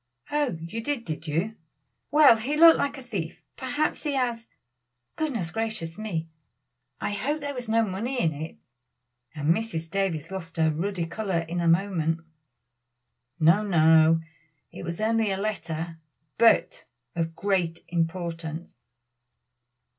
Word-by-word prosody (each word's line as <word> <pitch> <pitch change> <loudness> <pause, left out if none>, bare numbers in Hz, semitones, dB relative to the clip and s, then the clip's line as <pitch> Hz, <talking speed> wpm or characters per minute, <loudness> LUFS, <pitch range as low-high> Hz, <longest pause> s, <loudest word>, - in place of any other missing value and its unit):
"Oh, 290 - 0
you 170 +8 -5
did, 265 -1 -2
did 160 0 -5
you! 180 +9 -1 0.5
well 290 -5 +7
he 270 +7 -2
looked 330 +1 +8
like 285 0 -1
a 265 - -9
thief, 190 -9 -5
perhaps 285 +4 -1
he 295 -2 -1
has 240 -4 -1 0.7
goodness 235 - -2
gracious 220 -6 -3
me, 170 -7 -3 0.7
I - - -2
hope 285 +9 -1
there 285 -1 -4
was 245 -4 -6
no 225 0 +3
money 225 +7 -3
in 160 -6 +2
it," 155 +3 -7 0.8
and 150 +2 +3
Mrs. 170 -7 -4
Davies 185 -5 -1
lost 170 -4 -6
her 160 -1 +3
ruddy 175 +2 -2
color 190 -1 -1
in 175 +1 -2
a 170 - +1
moment. 165 -2 +2 1.2
"No! 165 +6 +5
no! 160 -4 +5 0.5
it - - -9
was 170 0 -4
only 220 0 +2
a 190 - 0
letter, 170 -5 -3 0.4
but 230 -2 +4 0.3
of 165 -1 -2
great 180 -4 0
importance." 165 -1 -3
190 Hz, 140 wpm, -26 LUFS, 165-230 Hz, 1.2 s, looked